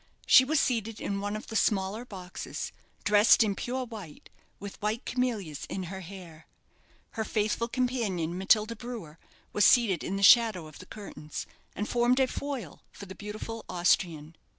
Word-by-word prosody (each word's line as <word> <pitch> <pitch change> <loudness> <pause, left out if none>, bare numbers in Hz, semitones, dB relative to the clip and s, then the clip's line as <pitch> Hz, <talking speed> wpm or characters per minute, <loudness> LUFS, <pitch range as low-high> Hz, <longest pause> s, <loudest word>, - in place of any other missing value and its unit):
She 260 - +8
was 295 +3 +1
seated 225 -3 -1
in 200 0 -3
one 205 +1 -2
of 215 - -6
the 225 - -8
smaller 210 +2 +1
boxes, 185 -5 -6 0.3
dressed 210 +2 +6
in 210 -2 0
pure 255 +5 -3
white, 210 -10 -11 0.3
with 200 -1 -9
white 215 +3 -2
camellias 220 - -2
in 190 - -3
her 190 - -5
hair. 170 -3 -11 0.6
Her 220 - -3
faithful 215 +2 0
companion, 230 -10 -1
Matilda 215 +4 +3
Brewer, 215 -10 -8 0.3
was 210 - +3
seated 205 -9 +5
in 195 - -3
the 200 - -2
shadow 220 -6 +6
of 155 -1 -12
the 185 - -12
curtains, 175 -8 -7 0.3
and 210 +3 -3
formed 245 +2 +2
a 265 - +5
foil 260 - -5
for 200 - -10
the 190 - -9
beautiful 215 +3 -7
Austrian. 170 -3 +1
210 Hz, 165 wpm, -29 LUFS, 185-235 Hz, 0.6 s, She